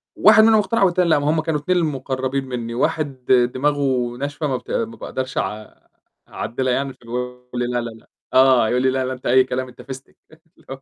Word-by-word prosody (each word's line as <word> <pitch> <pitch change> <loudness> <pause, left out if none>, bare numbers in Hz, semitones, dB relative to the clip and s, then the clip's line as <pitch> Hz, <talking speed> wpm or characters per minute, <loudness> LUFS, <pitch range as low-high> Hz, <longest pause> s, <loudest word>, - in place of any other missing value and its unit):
واحد 220 - +7
منهم 220 -1 +6
اقتنع 210 +1 +1
والتاني 180 -2 +2
لأ، 155 - +4
ما 145 +1 0
هُم 160 +1 +2
كانوا 155 -2 -1
اتنين 180 +5 0
اللي 165 -3 +1
مقربين 130 0 -3
مني، 120 -2 -5
واحد 135 +1 -2 0.3
دماغه 130 -3 0
ناشفة 145 +2 -3
ما 130 -2 -1
بت - - -11
ما 230 0 -2
باقدرش 130 0 -5
أع 105 +2 -4 0.5
أعدلها 130 +2 -2
يعني، 135 +1 -2
فاللي 115 -2 -15
هو 125 - -1
يقول 125 0 -6
لي: - - +1
"لا، 125 0 -1
لا، 120 - -5
لأ" 110 0 -16 0.2
آه، 130 -3 +5
يقول 125 +2 +1
لي: 130 - +3
"لا، 130 0 -1
لا 130 - -3
أنت 125 - -12
أي 130 +2 +5
كلام، 130 0 -3
أنت 125 - -13
فستك." 130 +1 -10
اللي 160 +2 -23
هو 135 0 -7
130 Hz, 230 wpm, -21 LUFS, 125-150 Hz, 0.5 s, واحد